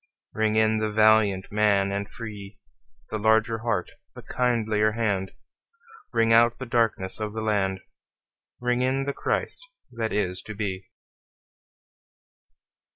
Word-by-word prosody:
Ring 110 0 0
in 110 0 +3
the 110 0 -1
valiant 105 -3 +3
man 100 -2 +2
and 100 +1 -3
free, 105 -3 -9 0.5
The 110 - -2
larger 110 +1 +2
heart, 115 -5 -2 0.2
the - - -10
kindlier 110 -4 +1
hand; 100 -4 -1 0.8
Ring 115 0 +3
out 120 +1 +5
the 130 - -6
darkenss 115 -6 0
of 105 -1 -4
the 110 - -4
land, 95 -3 0 0.8
Ring 125 0 0
in 130 +2 +1
the 140 +1 -2
Christ - - -2 0.3
that 115 -2 -3
is 90 -3 -1
to 110 - -9
be. 95 -2 -4
110 Hz, 130 wpm, -25 LUFS, 100-115 Hz, 0.8 s, out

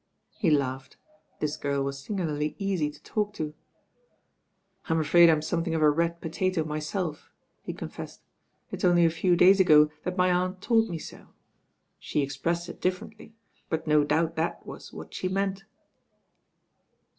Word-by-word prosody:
He 180 - 0
laughed. 135 -3 -1 0.4
This 150 -1 -2
gprl 140 -1 -1
was 140 0 -4
singularly 155 -5 -2
easy 190 -7 -1
to 150 - -15
talk 210 -1 -2
to. 150 -1 -4 1.4
"I'm 160 0 +2
afraid 170 +2 +6
I'm 155 -2 +2
something 165 +1 -1
of 155 - +1
a 150 - +6
red 170 +2 -1
potato 175 +1 -1
my 155 0 -3
self," 155 0 -4 0.3
he - - -5
confessed. - - -8 0.5
"It's - - -6
only 175 -1 +5
a 165 - +3
few 175 +2 +2
days 190 +3 +6
ago 150 -4 +6
that 180 +1 -4
my 180 0 +3
aunt 185 +1 0
told 225 +2 +2
me 170 - -3
so. - - -11 0.7
She 150 - -1
expressed 170 +6 -2
it 175 - -10
differently; 210 +4 -4 0.3
but 160 0 -2
no 150 -1 +4
doubt 160 +3 0
that 160 +1 -2
was - - -10
what - - -10
she 185 - -2
meant." 195 0 -2
165 Hz, 160 wpm, -27 LUFS, 150-185 Hz, 1.4 s, afraid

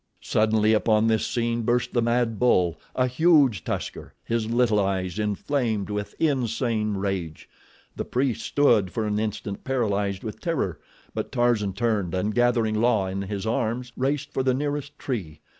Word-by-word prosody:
Suddenly 110 0 +2
upon 110 0 +3
this 110 -1 +2
scene 120 0 -1
burst 120 +2 0
the 120 - +2
mad 115 -1 +1
bull—a 90 +1 +1
huge 130 - +3
tusker, - - -5
his 115 -1 -1
little 115 -3 +3
eyes 95 -1 -1
inflamed 105 0 -1
with 105 0 -4
insane 115 -7 0
rage. 95 -5 -3 0.5
The - - -3
priests 125 -2 -1
stood 115 -10 +3
for 110 - -2
an 105 0 0
instant 105 -2 -4
paralyzed 100 -7 -1
with 110 - -6
terror; 155 - -2 0.3
but - - -4
Tarzan 115 -5 +1
turned 105 -5 0
and 105 +4 -1
gathering 115 -3 +2
La 115 -5 +3
in 95 +1 -3
his 100 0 -4
arms 120 +2 -1
raced 140 +2 -1
for - - 0
the 130 -1 +2
nearest 145 +1 -3
tree. 90 - -4
110 Hz, 155 wpm, -25 LUFS, 105-125 Hz, 0.5 s, upon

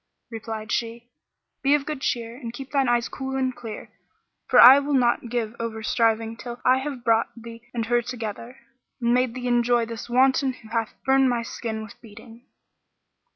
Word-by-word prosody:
Replied 220 -1 -6
she, 235 +1 -3 0.5
"Be 280 +1 +4
of 285 -1 -2
good 300 -3 -5
cheer 235 -2 -2
and 240 -3 -7
keep 270 +3 -9
thine 275 -3 +2
eyes 240 -1 +1
cool 265 0 -5
and 260 -1 -1
clear, 230 -3 -9 0.6
for 250 - +5
I 260 +4 +10
will 285 0 -1
not 240 -2 +1
give 230 -2 -2
over 225 -1 -4
striving 225 0 +1
till 240 +1 -8
I 255 +1 +5
have 265 -3 -6
brought 230 -2 +3
thee 230 +1 -12
and 230 -2 -2
her 240 +1 +2
together, 235 0 -7 0.4
and 235 -1 +1
made 250 -1 +1
thee 250 -1 -4
enjoy 240 -1 +2
this 230 +1 -8
wanton 260 +2 +3
who 220 -3 -16
hath 225 -1 -2
burnt 265 0 +4
my 240 -1 -1
skin 220 -1 -5
with 215 - -13
beating." 225 +2 -15
240 Hz, 185 wpm, -24 LUFS, 230-255 Hz, 0.6 s, I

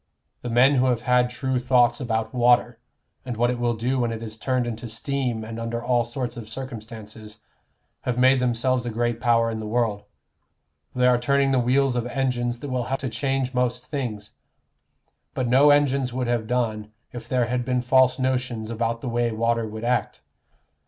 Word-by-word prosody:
The 120 - -5
men 130 +4 +4
who 130 +1 +3
have 120 -2 +1
had 125 0 +2
true 130 0 -2
thoughts 125 -1 +3
about 110 -2 -2
water, 120 -1 +3 0.4
and 125 -3 -5
what 120 +1 +2
it 125 - -4
will 120 -1 0
do 125 +4 -1
when 120 -1 0
it 115 0 -5
is 110 -1 -6
turned 125 +2 -1
into 120 0 -5
steam 120 0 -2
and 115 +1 -7
under 115 0 -3
all 120 0 +1
sorts 120 0 -4
of 110 -2 -8
circumstances, 110 -3 -9 0.6
have 125 -1 -2
made 130 +1 +5
themselves 125 0 0
a - - -1
great 120 0 -2
power 115 -1 +3
in 110 - -4
the 110 - -5
world: 110 -3 -1 0.9
they 125 - +2
are 125 -1 +4
turning 140 +2 +2
the 130 - +3
wheels 130 +2 +2
of 120 -1 -1
engines 125 -2 -1
that 145 - -5
will 125 -2 -1
help 135 +2 -2
to 130 - -2
change 130 +2 -1
most 125 0 -1
things. 120 -7 -5 1.0
But 125 - -1
no 135 +5 +5
engines 140 -3 +3
would 125 +1 -2
have 120 -2 -1
done, 110 -3 -2 0.2
if 120 - -8
there 125 -2 +2
had 125 +2 -1
been 125 0 -1
false 130 0 +4
notions 125 -4 -2
about 115 0 -2
the 125 - -4
way 120 0 0
water 115 0 0
would 110 +1 -7
act. 125 +1 -1
120 Hz, 195 wpm, -24 LUFS, 115-130 Hz, 1.0 s, made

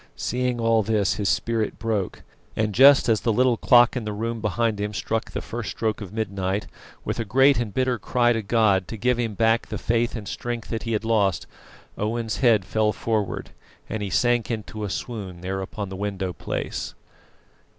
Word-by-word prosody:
Seeing 125 0 -1
all 115 -1 +3
this 105 -2 +1
his 105 -2 0
spirit 115 -2 0
broke, 110 -4 -2 0.3
and, 110 -1 0
just 135 +4 +7
as 110 -3 +2
the 115 - +1
little 125 +2 +3
clock 120 +1 +5
in 125 - -2
the 105 - -3
room 115 +2 -3
behind 110 0 0
him 105 0 -3
struck 115 0 -2
the - - -5
first 115 -1 -5
stroke 110 -1 -2
of 95 -3 -7
midnight, 100 -2 -2 0.4
with - - -2
a - - +1
great 135 +5 +4
and 115 -3 -2
bitter 130 +1 0
cry 120 -1 +2
to 115 - -1
God 100 -3 +2
to 115 - -6
give 125 +3 +1
him 115 -3 -2
back 115 +2 +2
the - - -4
faith 115 +1 0
and 105 -3 -6
strength 120 -2 -4
that 115 -2 -3
he - - 0
had 110 +1 -1
lost, 105 -5 +1 0.5
Owen's 110 +1 -2
head 115 -7 +3
fell 110 +1 +1
forward 110 -3 -2 0.4
and 110 - -4
he 100 - -3
sank 120 0 +2
into 110 -1 -4
a 105 - -2
swoon 95 -4 -5
there 95 +1 -3
upon 100 +1 -5
the 95 - -6
window 95 -2 -3
place. - - -4
110 Hz, 195 wpm, -24 LUFS, 105-120 Hz, 0.5 s, just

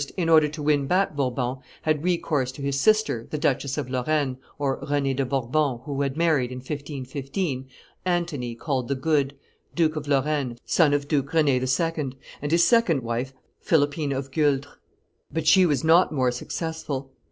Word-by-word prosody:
in 170 -3 0
order 155 -2 +6
to 150 0 -7
win 145 -2 +2
back 185 -1 +1
Bourbon, 130 -2 -1 0.3
had 155 -1 +1
recourse 160 -7 0
to 140 +2 -9
his 140 0 0
sister, 215 - +2
the 150 - -3
Duchess 140 -2 0
of 145 -4 -2
Lorraine 130 +1 0 0.2
[Renee 140 0 0
de 135 +1 0
Bourbon, 135 +1 0
who 140 -1 -2
had 140 0 -1
married, 155 -7 +2
in 125 - -6
1515, 135 +1 -4 0.4
Antony, 170 -10 -1
called 130 -1 -2
the 140 - 0
Good, 140 0 +1 0.4
Duke 160 -2 +2
of 150 -1 -5
Lorraine, 140 -3 0
son 150 -4 +3
of 145 0 -2
Duke 145 -2 0
Rend 155 -3 +4
II. 135 +2 0 0.3
and 145 - -2
his 170 +1 +5
second 170 - +3
wife, 120 +3 -2 0.3
Philippine 145 -4 +1
of 135 0 -3
Gueldres]: 145 -2 0 0.6
but 160 +1 -2
she 185 +3 +6
was 150 -1 0
not 165 +3 +5
more 130 -4 +1
successful. 140 0 -4
145 Hz, 165 wpm, -25 LUFS, 130-160 Hz, 0.6 s, order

